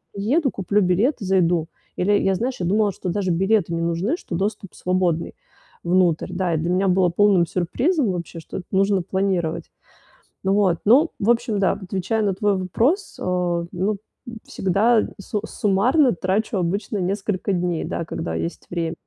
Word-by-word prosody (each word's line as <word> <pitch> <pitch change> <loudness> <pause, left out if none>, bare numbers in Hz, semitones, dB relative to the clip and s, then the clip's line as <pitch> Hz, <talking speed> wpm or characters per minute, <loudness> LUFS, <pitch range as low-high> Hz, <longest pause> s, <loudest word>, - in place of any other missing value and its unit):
приеду, 255 +8 0
куплю 200 +2 0
билет, 200 - +2
зайду. 180 -4 +1 0.3
Или 195 +3 +1
я, 190 -1 +1
знаешь, 245 +3 -3
я 175 - -1
думала, 205 +2 +2
что 185 - -6
даже 185 0 0
билеты 190 0 +1
не 165 - -2
нужны, 170 - 0
что 180 - -6
доступ 200 0 -3
свободный. 180 -2 -1 0.5
Внутрь. 175 -1 +1
Да, 180 -2 -1
и - - +2
для 165 +3 -2
меня 190 +2 +2
было 185 0 +3
полным 185 0 +3
сюрпризом 240 - 0
вообще, 170 -1 -6
что 160 - -7
нужно 195 0 +2
планировать. 185 -3 -2 0.7
Ну 190 - +2
вот, 195 -4 +3
ну 270 +10 +5
в 205 - 0
общем 235 -2 0
да. 195 - +3
Отвечая 190 +3 -2
на 200 -3 0
твой 205 0 +1
вопрос, 245 - 0
о, 175 -2 -1
ну, 195 +4 -1 0.3
н 235 -2 -7
всегда 215 +5 +2
су 205 +1 -3
суммарно 245 +7 +2
трачу 195 +4 -1
обычно 195 +4 -2
несколько 195 +1 -1
дней, 175 -2 -1
да, 170 - -3
когда 85 - -4
есть 80 +1 -5
время. 170 -1 -2
190 Hz, 165 wpm, -22 LUFS, 175-210 Hz, 0.7 s, ну